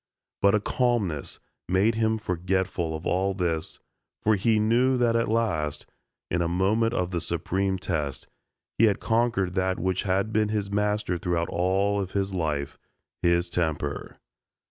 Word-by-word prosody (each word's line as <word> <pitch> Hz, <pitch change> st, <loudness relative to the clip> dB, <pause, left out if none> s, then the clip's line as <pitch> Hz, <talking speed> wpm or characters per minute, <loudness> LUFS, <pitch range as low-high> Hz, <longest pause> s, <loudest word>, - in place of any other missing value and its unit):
But 100 Hz, +1 st, +5 dB
a -, -, +3 dB
calmness 105 Hz, -, -1 dB, 0.3 s
made 95 Hz, +5 st, +3 dB
him 110 Hz, 0 st, +1 dB
forgetful 90 Hz, -3 st, -1 dB
of 80 Hz, -, -7 dB
all 95 Hz, +1 st, +1 dB
this 85 Hz, -4 st, -2 dB, 0.4 s
for 110 Hz, -, +4 dB
he 110 Hz, +2 st, +2 dB
knew 120 Hz, +4 st, +3 dB
that 120 Hz, -2 st, +2 dB
at 115 Hz, 0 st, +2 dB
last, 95 Hz, -10 st, -1 dB, 0.5 s
in 85 Hz, -, +1 dB
a 85 Hz, -, +1 dB
moment 105 Hz, +7 st, +1 dB
of 90 Hz, 0 st, -1 dB
the 85 Hz, -2 st, -1 dB
supreme 95 Hz, +3 st, -1 dB
test, 75 Hz, -7 st, -3 dB, 0.5 s
he 115 Hz, -, +7 dB
had 105 Hz, -3 st, +2 dB
conquered 115 Hz, -5 st, +1 dB
that 95 Hz, 0 st, 0 dB
which 95 Hz, 0 st, 0 dB
had 100 Hz, +3 st, 0 dB
been 110 Hz, -1 st, +2 dB
his 105 Hz, -2 st, -2 dB
master 105 Hz, -3 st, 0 dB
throughout 85 Hz, -2 st, -1 dB
all 95 Hz, +4 st, +1 dB
of 95 Hz, -1 st, -5 dB
his 100 Hz, -1 st, -1 dB
life 75 Hz, -5 st, -2 dB, 0.4 s
his 85 Hz, 0 st, +2 dB
temper. 80 Hz, -4 st, -2 dB
95 Hz, 155 wpm, -26 LUFS, 85-110 Hz, 0.5 s, he